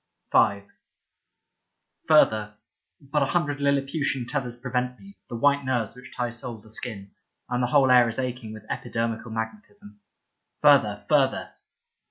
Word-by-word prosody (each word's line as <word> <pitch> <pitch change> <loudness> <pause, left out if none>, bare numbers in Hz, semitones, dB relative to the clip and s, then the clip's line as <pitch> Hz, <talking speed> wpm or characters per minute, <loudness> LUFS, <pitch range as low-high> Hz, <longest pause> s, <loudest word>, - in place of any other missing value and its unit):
50 - - +4
Leda 100 -3 +4
V - - -40
FURTHER 110 -9 +4 0.2
— - - -47
but 150 0 +2
a - - +4
hundred 145 -3 0
Liliputian 140 -2 0
tethers 125 -3 -3
prevent 125 0 -2
me, 200 0 -15
the - - -5
white 140 +4 +3
nerves 120 -5 -1
which 125 - -13
tie 120 -1 -1
soul 120 -1 -6
to 110 +1 -14
skin. 105 -4 -6 0.4
And 125 0 -1
the 125 - +1
whole 135 0 +4
air 125 -2 +6
is 115 - -6
aching 125 -3 -4
with 110 0 -11
epidermical 115 -1 -3
magnetism. 205 - -7 0.6
Further, - - +4
further. - - +2
125 Hz, 155 wpm, -25 LUFS, 115-140 Hz, 0.6 s, air